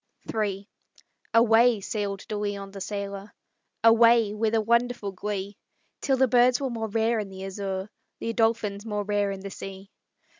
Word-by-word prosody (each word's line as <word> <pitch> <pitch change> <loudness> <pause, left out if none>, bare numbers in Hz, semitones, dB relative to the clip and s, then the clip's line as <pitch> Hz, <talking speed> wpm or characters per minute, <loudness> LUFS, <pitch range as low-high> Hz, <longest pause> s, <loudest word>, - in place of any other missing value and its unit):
III 200 -2 -2 0.7
Away 230 0 +5
sailed 200 -1 -4
De 215 - -4
Leon, 205 -1 -4
the 195 0 -9
sailor; 200 0 -5 0.5
Away 230 -1 +6
with 220 +1 0
a - - +4
wonderful 235 -2 +1
glee, 200 +1 -5 0.4
Till 270 -2 +1
the 265 0 +4
birds 245 +1 +4
were 270 -2 -2
more 225 -1 -3
rare 225 +2 +1
in 205 -2 -4
the 190 0 -8
azure, 195 0 -4 0.3
The 230 - -3
dolphins 225 -3 0
more 210 -2 -2
rare 205 0 0
in 195 -1 -5
the 195 0 -7
sea. 195 +1 -9
210 Hz, 160 wpm, -26 LUFS, 200-230 Hz, 0.7 s, Away